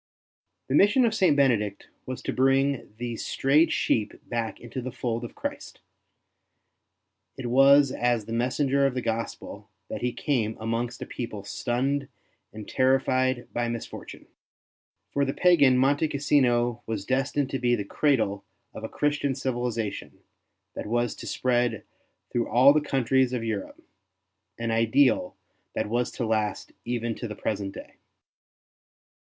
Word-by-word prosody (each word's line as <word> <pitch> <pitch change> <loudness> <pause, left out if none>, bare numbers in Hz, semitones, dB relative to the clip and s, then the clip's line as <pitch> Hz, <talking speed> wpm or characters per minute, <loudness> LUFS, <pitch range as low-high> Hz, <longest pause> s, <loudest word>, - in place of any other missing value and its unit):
The 130 - -2
mission 205 - +5
of 225 - +1
St. 180 -9 +3
Benedict 110 -7 +1 0.2
was 130 -1 -5
to - - -2
bring 135 0 +2
these 120 -1 -4
strayed 150 +5 +3
sheep 105 -2 0
back 115 -3 -3
into 120 +2 -6
the 130 +1 -5
fold 120 -1 -3
of 120 - -8
Christ; - - -6 1.6
it 130 - -6
was 135 +3 +6
as 120 -4 0
the 115 - -6
messenger 135 +3 +1
of 130 - -3
the 125 - -1
Gospel 110 -2 -4 0.2
that - - -5
he 125 - 0
came 115 -5 -1
amongst 115 +1 -3
a - - -7
people 110 -5 -6
stunned 135 +6 -1 0.4
and 105 -1 -9
terrified 130 -1 +1
by 120 0 -1
misfortune. 115 -1 -7 0.9
For 140 - +1
the 135 0 -2
pagan 145 -8 +5
Monte 140 +4 +3
Cassino 120 -5 +2
was 110 -3 -3
destined 135 +2 0
to 135 - -2
be 120 -1 +2
the 105 -4 -4
cradle 110 -6 +1 0.3
of - - -9
a - - -4
Christian 145 -2 0
civilization 120 -5 -3 0.5
that - - -6
was 120 +1 0
to. - - -9
spread 120 -3 0 0.5
through 120 -1 -1
all 130 +4 +6
the 155 - +2
countries 130 -2 +1
of 120 -2 -2
Europe 110 -4 -4 0.4
— - - -54 0.3
an 115 0 -2
ideal 115 +3 +2 0.4
that - - -1
was 120 +2 0
to 120 - -2
last 110 -1 -1
even 120 -1 -2
to 120 - -6
the 105 - -7
present 100 -1 -3
day. - - -11
125 Hz, 150 wpm, -26 LUFS, 115-135 Hz, 1.6 s, was